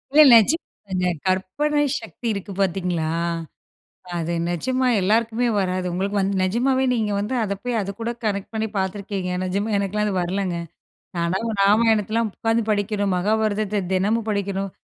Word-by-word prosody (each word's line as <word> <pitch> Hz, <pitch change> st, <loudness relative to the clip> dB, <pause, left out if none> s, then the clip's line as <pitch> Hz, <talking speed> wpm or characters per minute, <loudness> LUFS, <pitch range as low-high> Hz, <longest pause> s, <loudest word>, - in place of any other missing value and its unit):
இல்ல 305 Hz, -, +10 dB
நிஜமாங்க. 205 Hz, -, +2 dB, 0.2 s
கற்பனை 240 Hz, +12 st, +1 dB, 0.2 s
சக்தி 240 Hz, -, -7 dB
இருக்கு 200 Hz, 0 st, -6 dB
பார்த்தீங்களா, 180 Hz, -4 st, 0 dB, 1.1 s
அது 170 Hz, 0 st, -2 dB, 0.2 s
நிஜமா 255 Hz, +9 st, 0 dB
எல்லாருக்குமே 225 Hz, +4 st, +2 dB
வராது. 185 Hz, -1 st, -1 dB
உங்களுக்கு 200 Hz, +3 st, -1 dB
வந்து 195 Hz, +1 st, 0 dB
நிஜமாகவே 260 Hz, +7 st, +2 dB
நீங்க 215 Hz, -3 st, 0 dB
வந்து 210 Hz, +5 st, -2 dB
அதை 200 Hz, -2 st, -2 dB
போய் 245 Hz, -2 st, 0 dB
அதுக்கூட 200 Hz, +4 st, -4 dB, 0.2 s
கனெக்ட் 200 Hz, -1 st, -2 dB
பண்ணி 220 Hz, 0 st, -1 dB
பார்த்துருக்கீங்க. 190 Hz, 0 st, -2 dB
நிஜமா 200 Hz, +4 st, -1 dB
எனக்கெல்லாம் 205 Hz, +2 st, 0 dB
அது 190 Hz, -3 st, 0 dB
வரலைங்க. 180 Hz, 0 st, -1 dB, 0.6 s
நான் 170 Hz, +1 st, 0 dB, 0.3 s
ராமாயணத்தலாம் 220 Hz, +1 st, +3 dB
உட்காந்து 225 Hz, +2 st, 0 dB
படிக்கணும். 205 Hz, -1 st, 0 dB
மகாபாரதத்த 210 Hz, +1 st, 0 dB
தினமும் 210 Hz, +4 st, +1 dB
படிக்கணும். 195 Hz, -1 st, -2 dB
205 Hz, 130 wpm, -23 LUFS, 190-225 Hz, 1.1 s, இல்ல